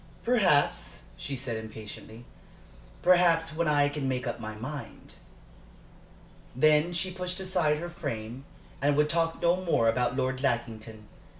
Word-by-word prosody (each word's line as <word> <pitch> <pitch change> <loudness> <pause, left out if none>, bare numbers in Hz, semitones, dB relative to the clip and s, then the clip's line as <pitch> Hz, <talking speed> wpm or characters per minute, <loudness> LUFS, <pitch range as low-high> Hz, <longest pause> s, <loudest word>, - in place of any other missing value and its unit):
"Perhaps," 195 -12 +2
she 140 - -5
said, 120 -3 -4
impatiently. 110 +1 -9 0.8
"Perhaps, 170 -4 +4
when 170 0 0
I 145 -1 +4
can 145 -1 -3
make 125 -1 -2
up 120 - -3
my 110 -1 -6
mind." 140 +7 -8 1.4
Then 155 +5 +4
she 185 +2 -2
pushed 180 +1 -4
aside 180 -5 +1
her 170 +3 -5
frame 130 -8 -5 0.4
and 145 +1 +3
would 150 0 +3
talk 165 -1 0
no 170 +1 +4
more 170 -11 +1
about 125 +2 +1
Lord 130 0 -1
Lackington. 110 -4 -3
145 Hz, 135 wpm, -28 LUFS, 120-170 Hz, 1.4 s, Perhaps